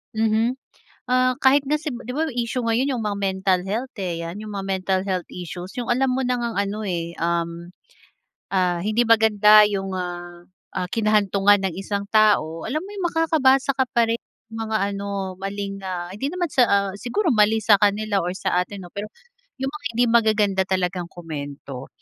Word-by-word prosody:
Mhm. 220 +2 +2 0.6
Ah, 255 0 +3
kahit 275 +1 +4
nga 295 - +1
si 300 0 -2
'di 245 -1 -6
ba 315 +2 0
issue 245 0 -2
ngayon 240 +4 +1
yung 235 - -3
mga 205 -1 -2
mental 190 -1 +1
health, 230 +7 -3
eh, 175 -3 -3
'yan 170 +4 -6
yung 210 -1 -7
mga 195 -1 -4
mental 190 0 0
health 185 -2 -2
issues, 180 +1 -8
yung 245 -2 -3
alam 255 +2 +2
mo 265 - 0
na 250 -1 0
ngang 235 -1 -3
ano, 200 +1 -4
eh, 170 -3 -2
um, 170 0 -2 0.8
ah, 180 -3 +1
hindi 215 +5 +1
maganda 215 -2 +6
yung, 195 -2 -3
ah, 175 -1 -5 0.3
ah, 180 - -2
kinahantungan 205 -2 +3
ng - - -9
isang 200 +1 -4
tao, 205 -8 +3
alam 295 +7 -2
mo 380 - -9
yung 395 -3 -4
makakabasa 275 -4 +3
ka 260 - +3
pa 230 -1 +3
rin 230 - +1 0.3
ng 225 - -8
mga 220 -1 -3
ano, 200 -2 -4
maling, 195 +1 -4
ah, 175 -2 -4
hindi 265 - -4
naman 355 -2 -1
sa, 255 -3 +4
ah, 200 -2 +2
siguro 285 - -1
mali 220 -3 +3
sa 205 -1 +5
kanila 205 0 +1
or 180 - -2
sa 185 - -1
atin 200 +1 -9
'no, 175 - -10
pero 200 +3 -5 0.6
yung 270 0 -1
mga 300 -1 -10
hindi 245 +1 +4
magaganda 215 -4 +3
talagang 180 -2 -1
komento 145 -5 -7
205 Hz, 190 wpm, -23 LUFS, 185-240 Hz, 0.8 s, maganda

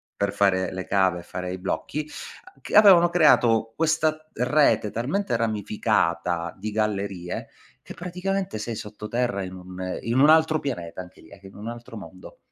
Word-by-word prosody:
per 100 -1 -1
fare 95 -2 +2
le 95 -1 -5
cave 95 -2 +2
e - - -11
fare 90 +1 -5
i 95 - -4
blocchi, 150 +10 -3 0.4
a - - -18
c - - -9
avevano 185 -5 +8
creato 115 -9 +4
questa 155 -1 0
rete 125 -4 +2
talmente 140 - -1
ramificata 90 -6 0
di 105 +3 -4
gallerie, 100 -4 -3 0.4
che - - -10
praticamente 180 - -3
sei 115 +1 -4
sotto 105 0 -8
terra 120 -4 -1
in 90 0 -7
un 90 0 -10 0.2
un 130 +6 +4
altro 160 -1 +5
pianeta 95 -10 -5
anche 90 - -14
lì, - - -18
ecco 95 0 -13
in 95 - -16
un 105 +3 -8
altro 120 -1 -8
mondo. 95 -2 -12
110 Hz, 170 wpm, -24 LUFS, 95-150 Hz, 0.4 s, avevano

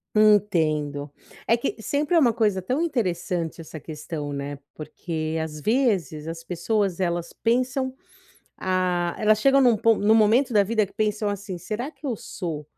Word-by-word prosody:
Entendo. 155 -9 +2 0.4
É 230 - +5
que 235 - -2
sempre 295 +7 0
é 330 - +7
uma 240 -6 +4
coisa 210 -4 +1
tão 255 - -1
interessante 180 - -2
essa 155 0 -9
questão, 150 -1 -6
né, 140 0 -4 0.2
porque, 155 +1 -4
às 155 -1 -5
vezes, 190 - 0
as 165 0 -6
pessoas 185 +2 -1
elas 170 -2 -1
pensam 255 +3 0 0.6
ah, 180 -2 0
elas 215 0 +3
chegam 275 +3 +5
em - - +6
um 235 - +4
pon 225 +1 +3
em 205 +2 +2
um - - +7
momento 225 +5 +4
da 210 -2 +5
vida 215 +1 +1
que - - -20
pensam, 210 -1 0
assim: 200 -2 -4
"Será 225 - -4
que 305 - -11
eu 255 - 0
sou, 165 -7 -6
200 Hz, 175 wpm, -24 LUFS, 165-230 Hz, 0.6 s, é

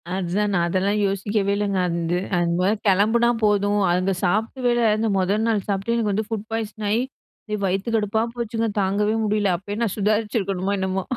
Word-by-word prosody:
அதுதான் 195 +3 -1
நான் 175 -3 +2
அதெல்லாம் 195 +4 0
யோசிக்கவே 200 +1 -1
இல்லைங்க. 200 -2 0
அந்து 170 0 -1 0.2
அந்த 170 -1 +1
மாரி 200 +4 +2
கெளம்புனா 220 +5 +3
போதும், 205 0 +2
அங்க 185 +2 +1
சாப்டவே 225 +7 0
இல்ல. 240 -1 +1
அந்த 225 +1 0
மொதல் 205 +4 +1
நாள் 210 -4 0
சாப்ட்டே 200 +4 -1
எனக்கு 215 -3 0
வந்து 215 +1 -1
ஃபுட் 220 -1 -4
பாய்சன் 220 -1 -4
ஆயி, 220 +3 +2 0.5
எ - - +2
வயித்து 195 +5 -1
கடுப்பா 215 0 +1
போச்சுங்க, 230 -1 -2
தாங்கவே 205 +3 +1
முடியல. 205 -3 +1
அப்பயே 205 +3 -6
நான் 215 - -1
சுதாரிச்சிருக்கணுமோ 200 -2 0
என்னமோ. 190 0 -1
205 Hz, 170 wpm, -23 LUFS, 190-220 Hz, 0.5 s, கெளம்புனா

